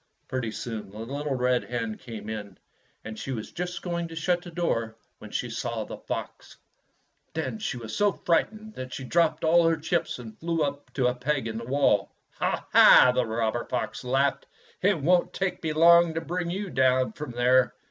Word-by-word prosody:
Pretty 130 -3 -2
soon 110 -1 -6
the 105 - -12
little 140 +5 -3
red 125 -1 +1
hen 115 -3 -3
came 110 -3 -9
in, 105 -2 -6 0.5
and 110 -1 -7
she 135 - -5
was 110 -4 -5
just 180 +1 -5
going 170 -1 -2
to 165 - -10
shut 175 +2 0
the 175 - -10
door 115 -10 -2 0.2
when - - -10
she - - -2
saw - - -3
the - - -8
fox. - - -6 0.8
Then 160 +7 -3
she 210 - -3
was 115 -2 -6
so 205 -1 +3
frightened 215 +7 -1
that 130 -5 -7
she 130 - -6
dropped 160 +3 +1
all 165 +1 +5
her 165 -1 +2
chips 160 +3 -1
and 115 -3 -10
fiew 165 -1 0
up 145 0 -6
to 130 - 0
a 125 - +3
peg 135 +1 -1
in 110 0 -4
the 115 - -7
wall. 125 -6 +2 0.3
"Ha, - - -1
ha!" 125 - +8
the 125 -2 +1
robber 115 +1 -1
fox 125 0 -3
laughed, 135 +2 +1 0.3
"it 195 -3 +3
won't 175 +5 +2
take 190 -1 -2
me 160 - -1
long 170 +1 +6
to 165 - -1
bring 175 +2 -3
you 195 +1 -4
down 130 0 +3
from 150 -2 -7
there." 125 +1 +3
140 Hz, 200 wpm, -27 LUFS, 120-170 Hz, 0.8 s, ha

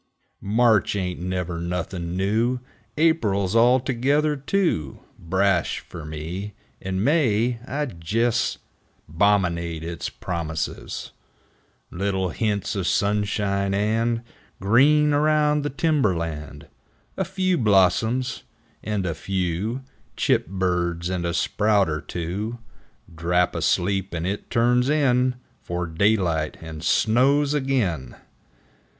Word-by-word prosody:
8 - - -10
March 110 -2 +3
ain't 90 -3 -2
never 90 -1 -3
nothin' 85 0 -3
new! 110 +6 +1 0.4
Aprile's 110 - +2
altogether 130 +5 +3
too 140 - -1 0.2
Brash 95 0 +1
fer 80 -4 -10
me! 85 +7 -6 0.3
And 95 +1 -2
May 120 -6 +2
I 145 +2 -2 0.2
jes' 115 +5 +1 0.5
'Bominate 85 -2 +1
its 85 -1 -4
promises, 80 -3 -4 0.8
Little 95 0 -1
hints 105 +3 -1
o' 100 - -1
sunshine 100 0 0
and 115 +3 0 0.4
Green 145 +9 +4
around 150 0 +3
the 145 - -2
timber 140 - +1
land 75 -3 -5 0.5
A 190 - 0
few 185 -1 0
blossoms, 110 +4 +2 0.4
and 105 -3 -2
a 85 - -1
few 95 +8 -2 0.3
Chip - - +2
birds, 90 -2 -1
and 90 -2 -1
a 85 - -2
sprout 105 0 +2
er 75 0 -2
two, 95 +9 -4 0.6
Drap 90 +2 +1
asleep, 95 0 0
and 85 0 -3
it 100 +3 -3
turns 125 +2 +2
in 130 -4 +2 0.3
'Fore 90 0 -3
daylight 85 -3 +1
and 80 -1 -8
snows 135 - +3
ag'in 110 - -1
100 Hz, 110 wpm, -24 LUFS, 85-125 Hz, 0.8 s, Green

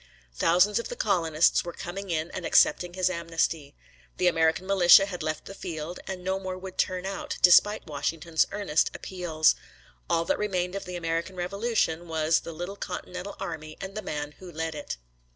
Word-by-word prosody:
Thousands 180 - +3
of 235 - -5
the - - -5
colonists 170 -7 +2
were 175 - -6
coming 195 +3 -6
in 160 0 -1
and 185 - -5
accepting 175 +1 +3
his 185 -1 +2
amnesty. 165 -4 -1 0.4
The 180 - 0
American 165 0 +3
militia 195 0 +7
had 180 -3 -6
left 155 0 -3
the - - -8
field, 170 -2 -6
and 185 -2 -5
no 190 +1 -1
more 185 -1 -5
would 185 0 -9
turn 185 0 0
out, 195 0 -4
despite 205 +4 +6
Washington's 160 +2 0
earnest 195 -6 +1
appeals. 170 -4 +1 0.6
All 165 0 +2
that - - 0
remained 185 -3 -1
of 195 - -5
the 180 0 -6
American 165 +2 -2
Revolution 180 -2 -1
was 160 0 +2
the - - -8
little 175 +5 -6
Continental 180 +1 -6
army 155 -4 -6
and 195 0 -6
the 215 - -4
man 150 -5 -4
who 185 -2 -10
led 160 0 -3
it. 145 - -5
175 Hz, 180 wpm, -27 LUFS, 160-190 Hz, 0.6 s, militia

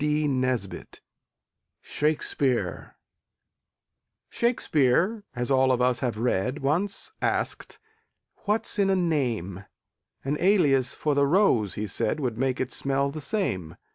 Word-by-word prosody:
SHAKSPEARE 135 - -1 1.4
Shakspeare, 200 - +1
as 125 +2 -2
all 130 0 +4
of 125 - +1
us 125 -1 +2
have 120 -3 -2
read, 125 +4 -1
Once 190 - -1
asked: - - -2 0.7
"What's 210 0 +1
in 195 -1 +3
a 195 - +3
name?" 120 - -1 0.6
An 145 +2 -1
alias 145 -9 +3
for 150 - 0
the 140 0 +3
rose, 140 - +2
he 105 - -3
said, 105 +7 -2
Would 120 -5 -3
make 130 -1 0
it 130 0 -2
smell 140 0 0
the 155 +1 -6
same. 95 - -2
135 Hz, 115 wpm, -26 LUFS, 125-170 Hz, 1.4 s, all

